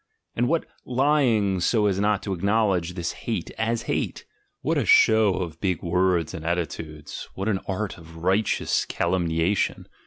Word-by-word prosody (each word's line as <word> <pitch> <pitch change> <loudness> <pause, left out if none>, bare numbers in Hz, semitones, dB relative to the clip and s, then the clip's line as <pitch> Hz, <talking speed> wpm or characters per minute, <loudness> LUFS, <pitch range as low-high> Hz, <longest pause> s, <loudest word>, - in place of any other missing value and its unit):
And 120 +1 +1
what 165 +3 +1 0.2
lying 125 -7 +2
so 105 +4 +2
as 100 -2 +1
not 105 0 +1
to 100 - -2
acknowledge 95 -2 +1
this 85 -2 -2
hate 110 -7 -4
as 115 +1 0
hate! - - -2 0.4
What - - 0
a - - +1
show 110 -3 +5
of 80 -3 -5
big 90 -5 -1
words 90 -1 +1
and 85 -4 -6
attitudes, 80 -3 -4
what 95 +2 -3
an 100 -3 +1
art 100 -1 -3
of 80 0 -14
"righteous" 95 +5 +1
calumni 85 -2 0
ation! 95 +4 0
95 Hz, 160 wpm, -25 LUFS, 85-110 Hz, 0.4 s, show